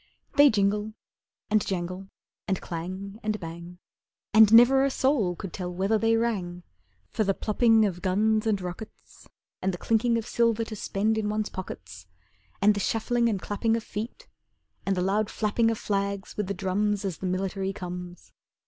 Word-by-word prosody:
They 290 Hz, 0 st, +8 dB
jingle 210 Hz, 0 st, 0 dB, 0.6 s
and 215 Hz, -1 st, +3 dB
jangle, 185 Hz, 0 st, -4 dB, 0.4 s
And 190 Hz, -2 st, 0 dB
clang, 185 Hz, +4 st, -6 dB
and 215 Hz, -1 st, -2 dB
bang, 170 Hz, +1 st, -8 dB, 0.6 s
And 215 Hz, -1 st, +7 dB
never 245 Hz, +4 st, +7 dB
a 275 Hz, -, +3 dB
soul 260 Hz, -10 st, +1 dB
could 190 Hz, -1 st, -7 dB
tell 180 Hz, -2 st, -4 dB
whether 195 Hz, +5 st, +1 dB
they 225 Hz, +1 st, +3 dB
rang, 185 Hz, -7 st, -2 dB, 0.5 s
For 220 Hz, -, 0 dB
the 195 Hz, -1 st, +1 dB
plopping 225 Hz, 0 st, +3 dB
of 180 Hz, -3 st, -3 dB
guns 215 Hz, +3 st, +1 dB
and 210 Hz, -3 st, +1 dB
rockets 180 Hz, +4 st, -9 dB, 0.3 s
And 190 Hz, -, +1 dB
the 175 Hz, -, -5 dB
chinking 230 Hz, +4 st, +1 dB
of 225 Hz, -, -3 dB
silver 230 Hz, -1 st, +1 dB
to 225 Hz, -1 st, -7 dB
spend, 215 Hz, +2 st, 0 dB
in 210 Hz, -1 st, -1 dB
one's 215 Hz, 0 st, -1 dB
pockets, 90 Hz, -, -8 dB, 0.6 s
And 210 Hz, +1 st, +6 dB
the 205 Hz, -, -3 dB
shuffling 235 Hz, +3 st, +1 dB
and 205 Hz, -4 st, -1 dB
clapping 225 Hz, +4 st, 0 dB
of 230 Hz, -, -5 dB
feet, 230 Hz, -, -6 dB, 0.6 s
And 195 Hz, -1 st, +1 dB
the 180 Hz, -, +1 dB
loud 205 Hz, +3 st, +1 dB
flapping 225 Hz, +2 st, +1 dB
Of 225 Hz, -, -1 dB
flags, 200 Hz, -1 st, -2 dB
with 210 Hz, -2 st, -2 dB
the 200 Hz, -, -3 dB
drums, 200 Hz, +2 st, 0 dB
As 185 Hz, -4 st, -3 dB
the 185 Hz, -, -3 dB
military 190 Hz, +1 st, -2 dB
comes. 180 Hz, -1 st, -8 dB
205 Hz, 175 wpm, -27 LUFS, 185-220 Hz, 0.6 s, They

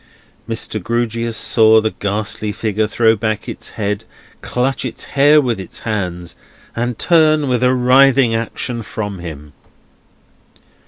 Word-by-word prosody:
Mr. 110 Hz, -1 st, -3 dB
Grewgious 115 Hz, +1 st, -2 dB
saw 110 Hz, -1 st, +4 dB
the 110 Hz, 0 st, -1 dB
ghastly 105 Hz, +1 st, -3 dB
figure 110 Hz, 0 st, -1 dB
throw 115 Hz, +1 st, +3 dB
back 110 Hz, 0 st, -3 dB
its -, -, -6 dB
head, 105 Hz, +1 st, -2 dB, 0.4 s
clutch 130 Hz, +2 st, -1 dB
its -, -, -6 dB
hair 145 Hz, +2 st, +5 dB
with 120 Hz, -7 st, -1 dB
its 95 Hz, -, -9 dB
hands, 90 Hz, -6 st, -4 dB, 0.4 s
and 120 Hz, 0 st, -2 dB
turn 155 Hz, -3 st, +3 dB
with 125 Hz, -1 st, 0 dB
a 125 Hz, +1 st, +3 dB
writhing 130 Hz, 0 st, +4 dB
action 115 Hz, +1 st, -3 dB
from 105 Hz, -3 st, -5 dB
him. 75 Hz, -4 st, -9 dB
115 Hz, 130 wpm, -17 LUFS, 105-125 Hz, 0.4 s, hair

